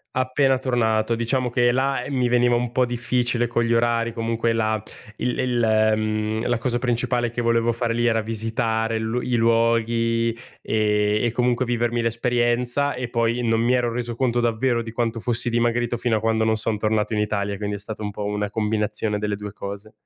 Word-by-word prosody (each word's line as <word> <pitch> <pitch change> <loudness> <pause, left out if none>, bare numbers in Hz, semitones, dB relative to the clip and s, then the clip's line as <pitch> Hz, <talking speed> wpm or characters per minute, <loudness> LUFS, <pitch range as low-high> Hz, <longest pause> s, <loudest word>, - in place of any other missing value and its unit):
Appena 130 +1 +2
tornato. 115 -3 +1
Diciamo 125 +2 0
che 120 0 +3
là, 135 0 0
ehm, 140 - -6
mi 125 -2 +1
veniva 120 0 +3
un 120 0 0
po' 125 0 +2
difficile 120 0 0
con 120 0 0
gli 115 0 +1
orari, 115 0 +1
comunque 115 0 -1
la 110 -1 0 0.4
il 125 - -2
il 125 -2 0 0.3
mhmm, 110 +1 -1
la 120 -1 0
cosa 120 -1 0
principale 120 -1 0
che 120 - -3
volevo 115 0 +2
fare 115 0 -1
lì 120 0 +1
era 115 -2 +2
visitare 115 0 -1
l 110 +2 -1
i 125 - 0
luoghi 115 0 +2 0.2
e 105 -1 +1
e 120 - +1
comunque 125 +1 +1
vivermi 120 0 0
l'esperienza 120 +3 0
e 125 0 -4
poi 115 0 0
non 115 -1 +1
mi 120 +2 +2
ero 120 -1 +1
reso 120 0 -3
conto 120 -1 +1
davvero 120 +1 +1
di 115 - -7
quanto 115 0 -2
fossi 120 +1 -1
dimagrito 120 0 0
fino 115 -1 +1
a - - -1
quando 110 0 +1
non 110 0 +2
son 110 0 -1
tornato 110 +1 0
in - - 0
Italia, 100 -1 -1
quindi 105 0 -3
è - - -11
stata 110 +1 -6
un 105 - -3
po' 105 +1 -6
una 105 0 -2
combinazione 105 -1 -1
delle 105 0 -2
2 105 0 -7
cose. 100 +1 -8
115 Hz, 195 wpm, -23 LUFS, 110-120 Hz, 0.4 s, che